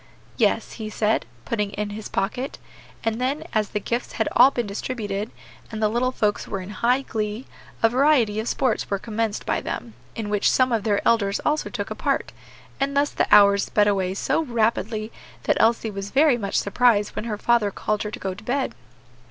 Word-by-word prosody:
"Yes," 225 -1 +1
he 215 - -4
said, 215 - 0 0.2
putting 210 -3 -2
it - - -9
in 210 0 -2
his 210 +1 -7
pocket; 250 +7 -2 0.5
and 225 +1 -1
then, 280 +5 -1
as 215 -2 +1
the 210 - -2
gifts 235 +5 -3
had - - 0
all 260 - +7
been 240 -3 -2
distributed, 205 0 -4 0.4
and 220 - -5
the 215 -1 +2
little 245 +3 +1
folks 210 -4 -1
were 195 - -3
in 185 +2 -8
high 245 +6 +1
glee, 215 +1 -3 0.4
a 225 - +6
variety 245 -4 +3
of 220 - -3
sports 255 -4 0
were 200 - 0
commenced 220 +1 -3
by - - 0
them, 115 -2 -5 0.2
in 220 -2 -4
which 205 -1 +3
some 255 -1 +3
of 225 -2 0
their 205 -2 +1
elders 200 -4 +2
also 300 +1 +1
took - - -5
a - - -3
part; - - -1 0.5
and 280 +1 0
thus 290 +1 +2
the - - 0
hours 200 -1 +6
sped 210 -1 +2
away 190 -2 0
so 265 - 0
rapidly 225 -4 -1 0.3
that - - +2
Elsie 225 -1 +2
was 195 0 -5
very 285 +1 +4
much 200 -4 -4
surprised 210 0 +2
when - - -3
her 215 -3 -3
father 235 -1 +2
called 210 +1 -2
her 210 - -3
to - - -6
go 190 -1 -3
to 205 +4 -12
bed. 265 +4 -1
220 Hz, 205 wpm, -23 LUFS, 205-240 Hz, 0.5 s, all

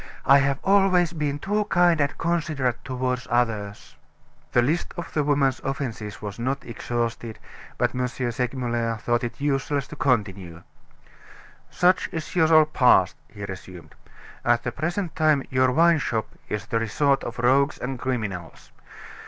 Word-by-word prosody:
I 140 +1 +7
have 140 -1 +1
always 190 -3 +3
been 150 -3 -2
too 205 +6 -1
kind 175 -5 +3
and 145 0 -1
considerate 155 -7 -1
toward 130 -1 -3
others." 115 -4 -2 0.5
The 120 - +3
list 155 +7 -1
of 175 - -6
the 150 - +1
woman's 140 -3 +1
offenses 115 -7 -5
was 105 +1 -6
not 130 +3 -2
exhausted, 115 -1 -4 0.4
but - - +1
M. 125 0 -1
Segmuller 120 -2 -2
thought 120 +2 -1
it 120 - -5
useless 140 -1 -1
to - - -8
continue. 100 - -1 1.1
"Such 180 +1 +2
is 160 +2 -6
your 160 -2 +6
past," 125 -11 +4
he 100 -1 -8
resumed. 95 -2 -10 0.5
"At 120 0 +2
the 120 - -2
present 170 - -3
time 155 -3 +3
your 130 0 +3
wine 165 +3 +4
shop 110 -5 -2 0.2
is 105 -1 -3
the 115 +1 -1
resort 135 +5 +1
of 120 - -6
rogues 135 +4 +3
and 130 0 -5
criminals. 105 -10 -4
130 Hz, 145 wpm, -24 LUFS, 115-150 Hz, 1.1 s, I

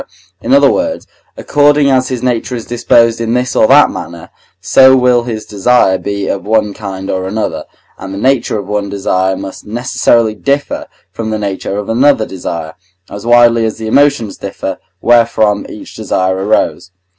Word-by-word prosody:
in - - -3
other 280 - +5
words, 280 0 -2 0.3
according 145 0 +2
as 130 -1 +2
his 130 -3 -4
nature 125 0 -1
is 115 - -6
disposed 115 -1 +2
in 115 +1 -1
this 125 0 -1
or 110 - +4
that 145 +2 +5
manner, 85 -1 -9 0.3
so 130 0 +5
will 125 -2 +2
his 110 -3 -5
desire 100 -2 +2
be 100 -1 -4
of 95 - -3
one 105 0 0
kind 95 -2 -7
or 95 0 -2
another, 105 +3 -3 0.3
and 95 - -8
the 95 - -6
nature 125 0 0
of 100 - -5
one 105 0 -3
desire 95 -1 -1
must 95 -1 -8
necessarily 115 -1 +1
differ 140 +6 -2 0.2
from 115 -1 -5
the 110 - -2
nature 100 -1 -4
of 105 - -4
another 120 0 +2
desire, 85 -4 -6 0.4
as 100 +3 -8
widely 120 -1 +4
as 110 -1 -2
the 110 - -7
emotions 135 -3 +1
differ, 95 -1 -5 0.2
wherefrom 110 -3 +2
each - - -11
desire 95 0 -1
arose. 100 0 -1
110 Hz, 170 wpm, -13 LUFS, 100-125 Hz, 0.4 s, other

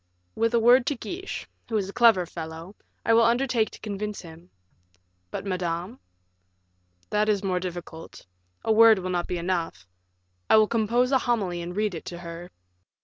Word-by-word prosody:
"With 230 +1 +1
a - - +4
word 240 +2 +5
to 290 - +1
Guiche, 365 +9 -6 0.2
who 225 - 0
is 195 -2 -1
a 200 - -8
clever 225 -7 +5
fellow, 165 +3 -8 0.3
I 230 - +4
will 230 - +6
undertake 235 -1 +2
to - - -13
convince 210 0 -5
him." 165 0 -13 0.8
"But 195 - -6
Madame?" 180 +4 -3 1.1
"That 210 +1 +2
is 205 -1 +1
more 185 -2 0
difficult; 175 -2 -8 0.4
a 225 - +2
word 225 0 +7
will 185 0 -4
not 175 -1 -1
be 180 - -2
enough. 170 - -3 0.6
I - - +7
will 215 - +6
compose 235 +4 +1
a 265 - +4
homily 200 -9 -1
and 175 +1 -6
read 210 -1 0
it 165 - -7
to 175 - -7
her." 170 0 -8
200 Hz, 175 wpm, -26 LUFS, 175-230 Hz, 1.1 s, word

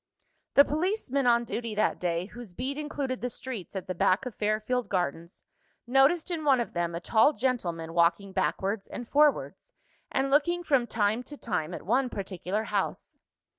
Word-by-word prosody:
The 280 - +8
policeman 300 - 0
on 235 0 +4
duty, 230 -2 -4
that 215 - +1
day, 175 0 -1
whose 220 -3 -11
beat 265 +3 -3
included 285 -3 -3
the 245 - -1
streets 235 -7 -7
at 190 - -4
the 185 - -3
back 185 +7 +2
of 250 - -5
Fairfield 215 +3 -1
Gardens, 170 -1 -3 0.4
noticed 275 +8 +3
in 325 -3 -2
one 275 -4 +4
of 235 - -3
them, 170 -1 -1
a - - -2
tall 225 - +4
gentleman 180 - -2
walking 170 +3 +2
backwards 195 +2 -1
and 245 - -7
forwards, 295 +2 +1 0.4
and 270 0 0
looking 345 +5 +2
from 270 -7 +2
time 215 +1 +1
to 290 - -9
time 175 - -2
at - - -9
one 255 +6 +2
particular 195 0 -3
house. - - -3
235 Hz, 170 wpm, -28 LUFS, 190-270 Hz, 0.4 s, The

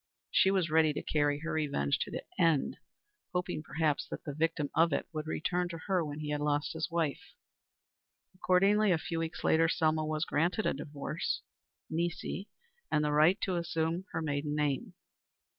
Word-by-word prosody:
She 190 - +5
was 185 -4 +1
ready 155 -1 +4
to - - -4
carry 145 -1 +1
her 165 - -3
revenge 140 - 0
to - - -2
the - - -5 0.2
end, 165 -5 +3 0.6
hoping, 180 -3 -1
perhaps, 150 0 0
that - - -6
the 145 - -5
victim 155 -1 0
of 165 0 +4
it - - -1
would 155 0 -4
return 175 +3 -1
to 170 - -5
her 185 -3 +2
when 150 0 -5
he 150 -1 -3
had 145 0 -1
lost 145 +1 0
his 160 +1 -2
wife. 165 -4 -2 1.0
Accordingly, 195 +3 +3
a 175 - +4
few 165 +1 -3
weeks 165 0 -4
later, 165 0 +4
Selma 155 -2 +2
was 155 +1 -1
granted 175 +8 +1
a - - +2
divorce 145 +3 -3 0.4
nisi 175 +4 -3 0.4
and 150 0 +2
the 150 - +1
right 155 +6 +5
to 190 - 0
resume 170 +1 -1
her 160 - -2
maiden 145 0 -1
name. 145 -3 -1
160 Hz, 175 wpm, -32 LUFS, 150-170 Hz, 1.0 s, She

